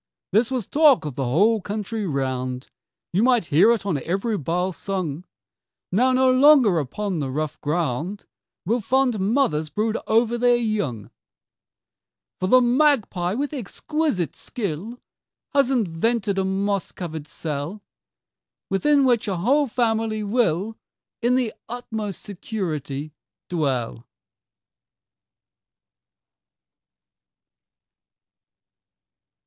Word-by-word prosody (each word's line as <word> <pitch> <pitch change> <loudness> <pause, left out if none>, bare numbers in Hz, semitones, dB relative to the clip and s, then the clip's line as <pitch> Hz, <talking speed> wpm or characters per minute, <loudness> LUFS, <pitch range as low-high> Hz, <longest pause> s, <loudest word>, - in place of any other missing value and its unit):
This 220 +4 +3
was 255 -6 -2
talk'd 290 - +4
of 150 - -4
the 135 +1 -2
whole 205 - +3
country 210 +1 -4
round; 130 -3 -3 0.4
You 190 - +2
might 245 -4 +3
hear 170 +9 +6
it 230 -4 0
on 165 -9 -1
every 195 - -1
bough 180 +3 -1
sung, 180 -4 -4 0.7
"Now 250 +8 +3
no 255 0 +4
longer 255 - +6
upon 185 +7 -3
the 140 -3 -2
rough 150 +2 -3
ground 165 +4 -2 0.4
Will 230 +6 +1
fond 255 0 +1
mothers 190 - +1
brood 220 +5 -1
over 235 +1 +2
their 245 0 +4
young:" 205 - -2 1.3
"For 185 - -1
the 255 +6 +6
magpie 240 -8 +2
with 285 +4 -2
exquisite 285 - -2
skill 215 +2 -5 0.5
Has 275 -2 +3
invented 210 -2 0
a - - +1
moss 195 0 -1
cover'd 160 -4 -6
cell 160 +5 -5 0.9
Within 280 +8 +3
which 240 -4 +2
a 190 -3 -1
whole 275 - +2
family 225 -2 0
will 210 -1 0 0.4
In 245 +1 +2
the 250 -4 0 0.2
utmost 220 -4 -5
security 155 - -4 0.4
dwell." 130 -8 -2
205 Hz, 110 wpm, -23 LUFS, 165-240 Hz, 1.3 s, hear